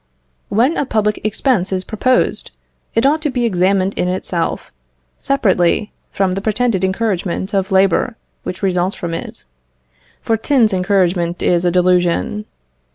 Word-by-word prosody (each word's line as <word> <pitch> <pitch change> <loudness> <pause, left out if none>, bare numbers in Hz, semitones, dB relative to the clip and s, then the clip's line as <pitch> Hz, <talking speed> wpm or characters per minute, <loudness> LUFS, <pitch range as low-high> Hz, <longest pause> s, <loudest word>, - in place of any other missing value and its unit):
When 245 +10 +2
a - - 0
public 210 -2 0
expense 215 -2 0
is 185 -1 -1
proposed, 250 +6 0 0.5
it 225 +3 +2
ought 305 +3 +3
to 300 - -1
be 245 -2 -1
examined 190 -1 +1
in 180 - -1
itself, 180 -2 -2 0.5
separately 205 -6 +1 0.2
from 190 -2 0
the 195 - -3
pretended 215 -2 0
encouragement 190 -1 -1
of 195 0 0
labour 190 +5 +2 0.3
which 185 +2 -6
results 185 0 +1
from 170 -1 -5
it, 165 - -7 0.7
for 225 - 0
tins 225 -3 +2
encouragement 180 -2 +1
is 175 0 +2
a 175 - +3
delusion. 180 +3 +1
195 Hz, 140 wpm, -17 LUFS, 180-225 Hz, 0.7 s, ought